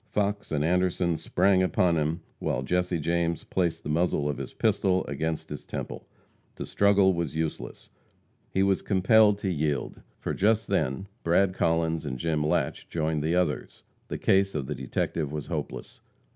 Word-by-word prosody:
Fox 100 0 -1
and 75 -1 +1
Anderson 90 0 +1
sprang 95 +3 +2
upon 90 -2 +2
him, 80 +2 -1 0.2
while 65 - -1
Jesse 90 +3 0
James 85 +1 -1
placed 85 -3 -1
the - - -5
muzzle 75 -2 +1
of 75 -3 -2
his - - -5
pistol 95 -1 +1
against 80 +3 -3
his - - -6
temple. - - -6 0.5
To - - -5
struggle 100 -1 +4
was 85 -4 -3
useless. 80 -1 -4 0.6
He 95 - +1
was 95 -1 +2
compelled 105 +2 +4
to 100 -2 -2
yield, 75 -3 -2 0.2
for - - -3
just 110 +1 +2
then 65 +9 0 0.2
Brad 90 +3 +3
Collins 80 -2 +1
and 65 - -4
Jim 80 +1 -1
Latche 75 - -1
joined 80 -2 -1
the 80 +3 0
others. 75 -8 -1 0.2
The - - -4
case 95 -1 +2
of 70 -3 -2
the 75 - -3
detective 70 +3 -2
was 75 -1 -4
hopeless. - - -6
85 Hz, 165 wpm, -27 LUFS, 75-95 Hz, 0.6 s, struggle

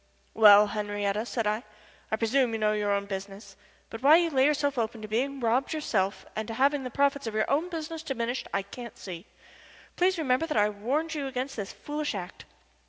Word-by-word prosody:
"Well, 210 -1 +8
Henriette," 205 +1 -2
said 230 -3 -2
I, 210 +2 0 0.5
"I - - +3
presume 235 +2 +1
you - - 0
know 215 -1 +2
your 210 -1 0
own 200 0 0
business, 195 0 -7 0.4
but 225 - -7
why 290 +4 +7
you 335 -1 +3
lay 265 -2 +4
yourself 285 -3 0
open 225 -1 -3
to - - -5
being 265 +6 -1
robbed 245 +5 +1
yourself 205 -10 -1
and 220 0 -3
to 225 - -5
having 275 +2 +2
the 255 - -4
profits 280 0 +1
of 220 - -4
your 215 - +1
own 315 +6 +1
business 325 -1 -5
diminished 250 -4 -3
I 200 - -1
can't 235 +4 -10
see. 180 0 -8 0.7
Please 370 +1 +3
remember 295 0 +1
that 300 - -2
I 210 0 +4
warned 265 +11 -2
you 290 -3 -3
against 265 +1 -4
this 200 -3 -5
foolish 295 -4 -4
act." 180 -2 -7
235 Hz, 205 wpm, -28 LUFS, 210-280 Hz, 0.7 s, Well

